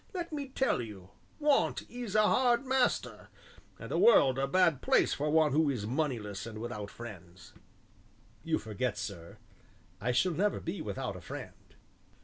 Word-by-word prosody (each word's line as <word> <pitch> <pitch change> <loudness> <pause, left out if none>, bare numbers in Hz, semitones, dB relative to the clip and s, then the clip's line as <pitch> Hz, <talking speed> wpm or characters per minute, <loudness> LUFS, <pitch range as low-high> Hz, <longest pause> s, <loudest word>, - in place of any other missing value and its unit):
Let 340 -3 -4
me 285 -2 -3
tell 265 - 0
you, 100 -5 -9 0.3
Want 295 -1 +2
is 240 -4 -6
a 215 - +5
hard 245 +3 +3
master, 260 -1 0 0.5
and - - -9
the - - +1
world 135 - +6
a 135 - +1
bad 170 -3 +3
place - - +3
for 150 +2 -1
one 155 -1 +4
who 150 +1 +3
is 120 -7 -2
moneyless 115 -6 -2
and 110 -1 -8
without 110 -3 -5
friends." 90 -6 -11 0.9
"You 160 -1 +1
forget, 110 0 -3
sir, 95 -4 -7 0.6
I 125 +4 0
shall 145 +9 +2
never 200 +5 0
be 170 +4 -5
without 125 -7 -4
a 90 - -9
friend." - - -10
135 Hz, 160 wpm, -31 LUFS, -, 0.9 s, world